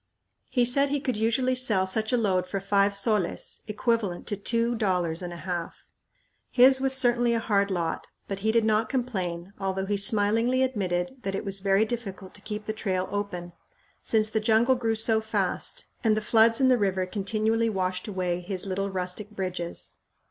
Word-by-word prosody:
He 245 -2 +2
said 275 +3 +3
he 290 +1 0
could 260 -4 -2
usually 230 +4 +1
sell 220 -7 +2
such 215 +3 0
a 250 - +3
load 185 -5 +1
for 195 +2 -3
five 200 +1 +2
soles, 200 -3 -1
equivalent 210 -4 -1
to 205 - -2
two 230 +4 0
dollars 180 -7 0
and 175 -1 -5
a - - -7
half! 175 -1 -4 0.7
His 265 +1 +6
was 265 0 +2
certainly 240 -2 +2
a - - +1
hard 200 -3 +1
lot, 175 -4 -2 0.2
but 195 -1 -4
he 220 +2 +1
did 230 -1 +2
not 215 0 +2
complain, 190 -8 -3
although 190 0 -2
he 205 +1 0
smilingly 225 +4 +2
admitted 205 -1 -1
that 195 0 -3
it - - -4
was 195 0 -2
very 195 +2 +3
difficult 200 -5 -6
to 205 - -6
keep 210 0 -6
the 215 - -2
trail 190 -4 -2
open, 180 -4 -4 0.5
since 215 -1 +1
the 220 - +1
jungle 225 +4 +3
grew 230 -3 0
so 220 0 +2
fast 220 0 -2 0.2
and 220 -2 +3
the - - +3
floods 225 +1 +4
in 265 - +4
the 255 -2 +4
river 190 -2 +1
continually 215 +4 0
washed 185 -2 -2
away 180 -3 -2
his 185 +1 -3
little 195 +1 -2
rustic 185 +2 -4
bridges. 185 -4 -5
210 Hz, 185 wpm, -27 LUFS, 190-230 Hz, 0.7 s, His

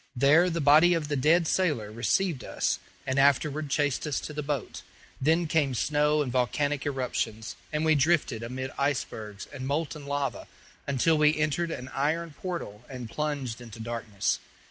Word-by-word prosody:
There 150 +8 +5
the 170 -1 -2
body 155 +5 +6
of 155 -3 -2
the 145 - 0
dead 160 +5 +3
sailor 145 - 0
received 130 - 0
us, - - -1 0.3
and 130 +1 0
afterward 145 +2 +2
chased 145 +1 0
us 145 - -1
to 150 - -6
the 150 - -3
boat. 145 -4 -3 0.4
Then 160 +5 +3
came 150 -5 +1
snow 150 +3 +2
and 130 - -4
volcanic 140 +4 0
eruptions, 120 -5 -2 0.2
and 155 +1 0
we 160 - +5
drifted 145 -5 +2
amid 130 +3 -5
icebergs 110 -7 -2
and 130 -2 -5
molten 145 -1 -2
lava 145 -1 -2 0.4
until 150 +4 +2
we 150 +1 +4
entered 155 +3 0
an 130 -5 -6
iron 155 +3 -1
portal 165 - -5
and 125 -4 -7
plunged 140 -6 -3
into 115 -1 -10
darkness. 110 -3 -2
145 Hz, 165 wpm, -28 LUFS, 125-155 Hz, 0.4 s, body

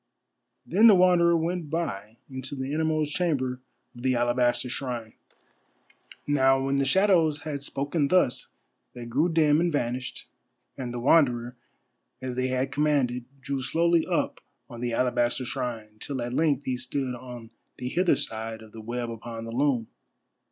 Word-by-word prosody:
Then 210 +7 +5
the 210 - +8
Wanderer 175 -2 +5
went 165 -1 -2
by, 110 -10 -3
into 130 0 -5
the 135 +1 -4
innermost 155 -1 0
chamber 130 -8 0 0.3
of 120 - -10
the 130 0 +1
alabaster 120 +1 +1
shrine. 120 -3 -4 1.1
Now 135 -2 +3
when 135 0 +1
the 140 - +2
shadows 165 -2 +3
had 145 -2 -4
spoken 140 +2 -1
thus, 180 -6 +2 0.5
they 120 -1 -7
grew 140 +9 +1
dim 155 -1 +4
and 175 0 +1
vanished, 125 -3 -3 0.5
and 125 -2 -5
the 120 - -4
Wanderer, 125 -3 +3 0.6
as 130 -1 -5
they 130 0 0
had 130 +1 -1
commanded, 140 -5 +1 0.2
drew 135 0 -3
slowly 165 +5 +2
up - - -1 0.3
on 120 -1 -9
the 120 -1 -1
alabaster 120 +1 +1
shrine, 110 -3 -4
till 135 +2 -4
at 120 +1 -4
length 145 -2 +1
he 130 -1 -1
stood 130 0 -3
on 125 -2 -9 0.3
the 125 - -5
hither 175 +1 +3
side 110 -2 -3
of 110 - -15
the 110 - -9
web 120 +1 -4
upon 115 0 -7
the 115 - -6
loom. 125 -2 +1
130 Hz, 160 wpm, -27 LUFS, 120-150 Hz, 1.1 s, the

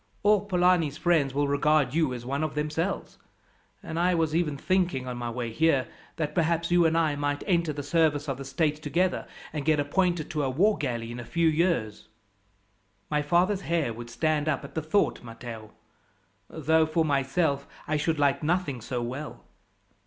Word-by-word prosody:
All 205 -1 +5
Polani's 180 -6 +2
friends 165 -6 +2
will 145 +2 0
regard 140 -1 +2
you 155 -4 +2
as 120 -1 -6
one 140 +4 -2
of 155 -2 -3
themselves; 155 +5 -2 0.6
and 160 - -4
I 180 +1 +3
was 160 -2 0
even 155 -4 0
thinking, 180 -6 0
on 125 - -4
my 120 -1 -4
way 120 -1 -4
here, 140 0 +2 0.3
that 150 -2 -2
perhaps 170 0 0
you 175 -1 +5
and 160 +1 +1
I 155 -3 +2
might 145 0 -2
enter 170 -5 +1
the 145 -1 -5
service 155 -1 +1
of 135 -1 -3
the - - -5
state 150 +2 -1
together, 175 +5 0 0.3
and 150 -2 -3
get 155 0 +2
appointed 170 +2 0
to 150 - -1
a 135 - 0
war 195 +11 +3
galley 120 -6 -3
in 120 - -6
a - - -6
few 170 +6 +1
years." 160 - 0 1.0
"My 150 0 +2
father's 180 +6 +2
hair 165 -10 0
would 120 +1 -9
stand 150 +5 0
up 140 -2 -1
at 140 - -11
the 160 - -2
thought, 155 +7 +1
Matteo; 115 -2 -9 0.8
though, 160 +1 +2
for 160 +1 +1
myself, 140 0 0 0.2
I 155 - +1
should 155 +1 0
like 140 -1 +2
nothing 155 -5 -1
so 120 +2 -3
well. 130 +6 -6
150 Hz, 185 wpm, -27 LUFS, 135-170 Hz, 1.0 s, All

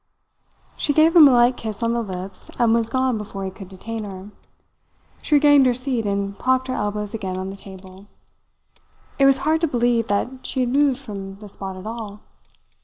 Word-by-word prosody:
She 290 - 0
gave 315 +3 +4
him 315 -4 +10
a - - +5
light 245 0 +4
kiss 220 0 -5
on 230 0 +1
the 235 - 0
lips 190 -2 -5
and 235 -2 +3
was 230 -1 +1
gone 255 -2 0
before 195 -2 -6
he 190 - -4
could 190 0 -11
detain 220 +4 -6
her. 195 0 -9 0.9
She 300 - +1
regained 290 -2 +6
her 245 - +2
seat 250 -4 -2
and 200 0 -2
propped 260 0 +1
her - - -1
elbows 210 -1 -3
again 190 -4 -4
on 190 +1 -4
the - - -8
table. 190 0 -13 1.1
It 275 - +5
was 275 -1 +6
hard 315 +1 +2
to 330 - +2
believe 240 -3 +1
that 250 +6 -2
she 260 - -2
had 245 - 0
moved 275 0 +2
from 200 -7 -8
the 210 +1 -12
spot 195 -1 -7
at 185 - -10
all. 215 -2 -7
225 Hz, 200 wpm, -22 LUFS, 200-260 Hz, 1.1 s, him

